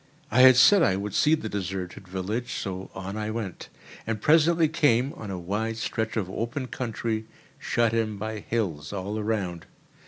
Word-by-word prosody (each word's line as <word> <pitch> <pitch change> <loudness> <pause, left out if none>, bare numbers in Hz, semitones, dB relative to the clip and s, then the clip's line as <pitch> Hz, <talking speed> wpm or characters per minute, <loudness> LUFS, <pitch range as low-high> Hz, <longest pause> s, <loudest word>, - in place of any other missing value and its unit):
I 125 +4 +5
had 130 0 +9
said 195 +9 +7
I 95 - +3
would 100 +1 -4
see 155 +2 +4
the 110 - -5
deserted 95 -2 -5
village, 100 +6 -3
so 95 -1 -5
on 95 +1 -5
I 105 0 -3
went, 110 -5 -5 0.4
and 115 -1 -1
presently 160 +5 +4
came 140 -4 +2
on 105 - -8
a 95 - -4
wide 105 +6 -2
stretch 110 0 -2
of 100 -5 -1
open 120 +7 -4
country, 115 -2 -3 0.3
shut 115 -1 +1
in 110 -2 0
by 110 +1 -4
hills 90 -11 -3
all 100 +2 -3
around. 100 -6 -2
110 Hz, 175 wpm, -26 LUFS, 95-120 Hz, 0.4 s, had